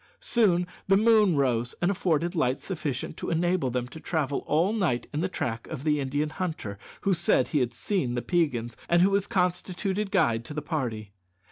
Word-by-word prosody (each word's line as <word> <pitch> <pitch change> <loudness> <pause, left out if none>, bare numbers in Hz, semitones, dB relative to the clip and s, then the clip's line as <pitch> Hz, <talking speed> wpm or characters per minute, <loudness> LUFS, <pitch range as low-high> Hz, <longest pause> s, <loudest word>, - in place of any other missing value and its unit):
Soon 185 -7 +2 0.2
the 195 0 +5
moon 215 -4 +5
rose 125 -4 +1
and 175 +2 +2
afforded 170 -2 0
light 135 -6 +1
sufficient 155 -9 -4
to - - -4
enable 170 -3 +1
them 125 0 -2
to 160 - -10
travel 150 -4 -1
all 170 +7 +2
night 165 - 0
in 150 - -1
the 185 - 0
track 115 -9 -3
of 150 -4 -6
the 150 -1 +2
Indian 145 +3 -1
hunter 155 - -4 0.2
who 195 - +2
said 170 -7 +2
he 150 - +1
had 125 -2 0
seen 125 - -1
the 120 - -2
Peigans, 125 -10 0
and 170 +1 +5
who 195 - +4
was 200 0 +1
constituted 185 +2 -1
guide 135 - +2
to 150 - -8
the 150 - -2
party. 120 - -3
160 Hz, 195 wpm, -27 LUFS, 125-185 Hz, 0.2 s, the